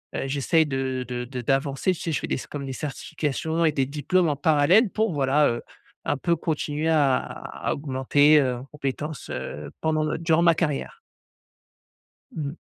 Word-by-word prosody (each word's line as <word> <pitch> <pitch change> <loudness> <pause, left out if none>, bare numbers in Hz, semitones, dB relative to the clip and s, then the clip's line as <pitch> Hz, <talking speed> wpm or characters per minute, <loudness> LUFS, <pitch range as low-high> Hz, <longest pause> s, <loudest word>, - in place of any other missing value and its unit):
heu, - - -1
heu, - - -3
j'essaie 145 +4 +2
de 130 -2 -2
de 125 -1 -4
de 125 0 -6
d'avancer 135 +6 +1
tu 175 - -9
sais? 165 - -2
Je 150 - 0
fais - - -5
des - - 0
s - - -7
comme 140 -2 -6
des 135 - -5
certifications 155 +3 -2
et 155 - +4
des 135 -2 0
diplômes 155 +5 +1
en 145 - 0
parallèle 160 - +4
pour 215 -4 0
voilà, 145 +1 +3
heu, 120 0 -2 0.4
un 145 - 0
peu 170 +5 +1
continuer 155 -1 -2
à 145 -5 +4
à - - -6
à - - +2
augmenter, 145 +2 +3
heu, 130 -2 0
en 125 - -9
compétences, 140 -1 -5
heu, 75 0 -6
pendant 155 -1 +1
le 155 - -1
durant 165 0 +2
ma 170 -1 +5
carrière. 150 -4 -2 1.3
Mmh. 150 -1 -4
145 Hz, 195 wpm, -25 LUFS, 135-160 Hz, 1.3 s, ma